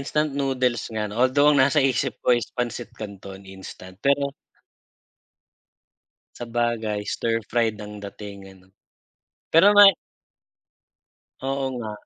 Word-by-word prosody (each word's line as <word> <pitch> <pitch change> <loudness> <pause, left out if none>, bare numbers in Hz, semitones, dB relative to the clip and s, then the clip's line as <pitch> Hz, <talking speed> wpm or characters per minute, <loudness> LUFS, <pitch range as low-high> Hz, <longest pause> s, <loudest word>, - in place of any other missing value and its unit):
instant 150 +2 -1
noodles 130 -4 0
nga 110 -1 -2
'no, 105 - -8
although 145 +3 +4
ang 145 - +3
nasa 140 +3 +3
isip 135 +1 -2
ko - - -4
is 120 - -6
pansit 120 -2 -4
canton, 100 -2 -8 0.2
instant, 95 -1 -11
pero 140 0 +2 2.1
sabagay 115 -3 -2
stir-fried 115 -1 -1
ang 105 0 -9
dating 100 -1 -9 0.2
'no. 95 +1 -26 0.7
Pero 190 +6 +6
may 205 -2 +8 1.5
Oo 135 0 -2
nga. 110 -3 -5
120 Hz, 115 wpm, -23 LUFS, 105-135 Hz, 2.1 s, may